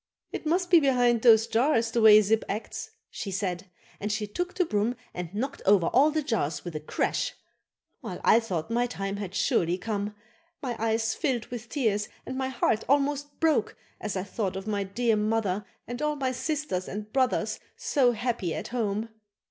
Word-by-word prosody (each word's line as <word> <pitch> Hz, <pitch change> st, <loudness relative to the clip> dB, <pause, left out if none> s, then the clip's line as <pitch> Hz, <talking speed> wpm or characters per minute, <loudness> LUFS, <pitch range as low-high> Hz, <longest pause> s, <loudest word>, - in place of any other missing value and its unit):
"It -, -, -5 dB
must 355 Hz, +3 st, +1 dB
be 345 Hz, -, +9 dB
behind 245 Hz, -5 st, +3 dB
those 225 Hz, -2 st, +7 dB
jars, 230 Hz, -1 st, +2 dB
the 235 Hz, -, +1 dB
way 215 Hz, -1 st, +9 dB
Zip 215 Hz, +2 st, +2 dB
acts," 215 Hz, -, -4 dB, 0.2 s
she 200 Hz, -, -5 dB
said; 190 Hz, -1 st, -3 dB, 0.3 s
and 210 Hz, +1 st, -2 dB
she 215 Hz, 0 st, -1 dB
took 355 Hz, -, -4 dB
the 365 Hz, -, +2 dB
broom 215 Hz, -2 st, 0 dB, 0.2 s
and 180 Hz, -2 st, -5 dB
knocked 230 Hz, +8 st, -3 dB
over 195 Hz, -3 st, +5 dB
all 280 Hz, +4 st, +5 dB
the 310 Hz, 0 st, -1 dB
jars 160 Hz, -, -1 dB
with 175 Hz, -3 st, -6 dB
a -, -, -1 dB
crash. 150 Hz, -, -1 dB, 0.7 s
Well! -, -, -6 dB
I 225 Hz, -, +6 dB
thought 190 Hz, -5 st, -3 dB
my 240 Hz, +1 st, +2 dB
time 195 Hz, -4 st, -4 dB
had 200 Hz, -2 st, -6 dB
surely 175 Hz, -2 st, +2 dB
come. 210 Hz, +1 st, -3 dB, 0.4 s
My 250 Hz, -4 st, -3 dB
eyes 225 Hz, 0 st, +1 dB
filled 255 Hz, -7 st, -1 dB
with 240 Hz, -1 st, -6 dB
tears 215 Hz, -6 st, 0 dB, 0.2 s
and 260 Hz, -, -5 dB
my 265 Hz, 0 st, -1 dB
heart 235 Hz, -3 st, +1 dB
almost 285 Hz, +1 st, +1 dB
broke 310 Hz, -9 st, +2 dB, 0.2 s
as 210 Hz, -2 st, -3 dB
I 185 Hz, -, -1 dB
thought 200 Hz, -2 st, -3 dB
of 190 Hz, 0 st, -5 dB
my 205 Hz, -2 st, -1 dB
dear 225 Hz, +4 st, +1 dB
mother 210 Hz, -2 st, 0 dB, 0.2 s
and 240 Hz, +3 st, -5 dB
all 300 Hz, 0 st, +1 dB
my 265 Hz, -3 st, -1 dB
sisters 270 Hz, -, -2 dB
and 210 Hz, +2 st, -6 dB
brothers 260 Hz, -2 st, +1 dB, 0.2 s
so 285 Hz, -, +2 dB
happy 230 Hz, -7 st, -2 dB
at -, -, -5 dB
home. 225 Hz, -2 st, -1 dB
225 Hz, 190 wpm, -27 LUFS, 205-260 Hz, 0.7 s, be